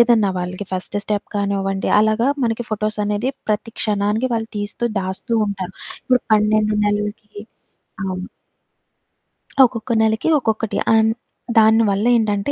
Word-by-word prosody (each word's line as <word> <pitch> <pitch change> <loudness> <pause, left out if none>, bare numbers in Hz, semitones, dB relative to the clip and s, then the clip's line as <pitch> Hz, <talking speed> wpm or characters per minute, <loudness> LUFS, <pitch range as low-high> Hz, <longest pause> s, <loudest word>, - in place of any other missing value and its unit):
ఏదన్నా 230 -4 +4
వాళ్ళకి 180 +2 -5
first 185 +2 -3
step 210 -1 -2
కానివ్వండి, 195 -1 -1
అలాగా 220 +4 +2
మనకి 230 0 -1
ఫోటోసనేది 215 +2 -1 0.2
ప్రతి 215 +2 -1
క్షణానికి 210 +3 0
వాళ్ళు 225 -1 -2
తీస్తూ, 205 +3 -4 0.2
దాస్తూ 190 +5 -5
ఉంటారు. 190 -2 -5 0.3
ఇప్పుడు 250 -1 +2
12 215 0 +3
నెలలకి 210 +1 -2 0.8
అవును. 185 0 -4 1.4
ఒక్కొక్క 235 0 -4
నెలకి 220 +6 +1
ఒక్కొక్కటి. 220 -3 -1 0.2
అన్ 220 0 +4 0.5
దాని 220 +1 +6
వల్లేంటంటే, 210 +2 +1
215 Hz, 115 wpm, -20 LUFS, 200-225 Hz, 1.4 s, దాని